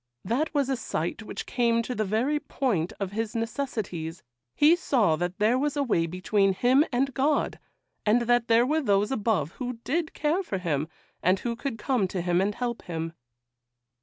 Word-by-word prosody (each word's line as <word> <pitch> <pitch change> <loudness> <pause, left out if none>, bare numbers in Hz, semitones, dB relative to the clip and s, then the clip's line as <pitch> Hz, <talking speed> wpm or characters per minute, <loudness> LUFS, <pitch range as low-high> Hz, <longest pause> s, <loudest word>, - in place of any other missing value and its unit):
That 280 +8 0
was 285 -4 +1
a 270 - +1
sight 250 - -3
which - - -6
came 235 -1 +1
to 250 - -3
the 220 - 0
very 235 +9 +1
point 210 - -1
of 195 -2 -3
his 220 +1 -3
necessities; 220 - -3 0.3
he 310 +4 +6
saw 235 - +2
that 175 +2 -3
there 225 +5 +3
was 290 +1 -1
a 285 - +2
way 170 -10 +1
between 190 +3 +1
him 255 +7 +4
and 270 +2 +1
God, 285 +3 +1 0.4
and 225 +3 +3
that 240 0 +2
there 230 +1 +5
were 310 +4 +1
those 205 -3 +2
above 210 - 0
who 250 0 -2
did 320 +3 -1
care 310 +5 +1
for 210 - -3
him, 155 -5 -1 0.3
and 185 +2 +3
who 235 -1 -2
could 240 -1 -4
come 225 -2 +1
to 180 -1 -3
him 175 0 +1
to 195 +2 +2
help 240 -2 -2
him. 165 -1 -4
230 Hz, 190 wpm, -27 LUFS, 190-270 Hz, 0.4 s, he